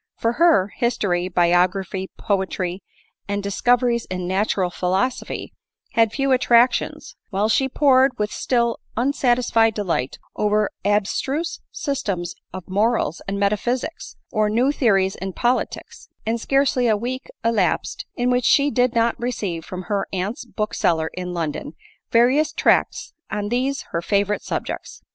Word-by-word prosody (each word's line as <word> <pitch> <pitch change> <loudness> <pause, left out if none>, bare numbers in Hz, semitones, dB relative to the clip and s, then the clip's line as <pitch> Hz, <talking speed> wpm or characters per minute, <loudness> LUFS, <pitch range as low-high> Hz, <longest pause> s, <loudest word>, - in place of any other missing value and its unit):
Fo$ 230 - +1
her, 240 - +3
history, 200 -8 0
biography, 180 +2 +1
poetry, 190 -3 -2 0.5
and 205 0 -2
discoveries 235 +3 +2
in 180 -1 -4
natural 190 -1 0
philosophy, 190 +8 -2 0.4
had 225 -4 +3
few 275 +3 0
attractions, 245 -1 +2
while 205 0 +1
she 265 +4 +2
pored 265 -1 +4
with 210 0 -1
still 235 -2 0 0.2
unsatisfied 240 -3 +2
delight 170 -11 -2 0.2
over 210 0 +1
abstruse 215 - 0
systems 200 - -3 0.2
of 185 -1 -8
mor 215 +5 +2
als 160 - -3
and 200 0 -2
metaphysics, 235 +9 -1 0.2
or 215 -2 +1
new 245 +6 +2
theories 195 -9 +2
in 190 0 -5
politics; 245 +5 -2 0.2
and 225 +1 -1
scarcely 270 -2 +2
a 215 -2 +3
week 255 +4 -5 0.2
elapsed 220 -6 0
in 245 +1 +1
which 250 -1 +1
she 285 0 +4
did 250 -2 +1
not 230 0 +3
receive, 205 -9 -3
from 185 +2 -7
her 200 +1 -2
aunt's 195 +6 -3
bookseller 175 -8 -1
in 180 0 -5
London, 160 -3 -4 0.4
various 260 +6 +4
tracts - - +1 0.2
on 205 -1 -3
these 260 +4 -1
her 170 - -1
favorite 200 +2 0
subjects. - - -5
215 Hz, 135 wpm, -22 LUFS, 190-245 Hz, 0.5 s, pored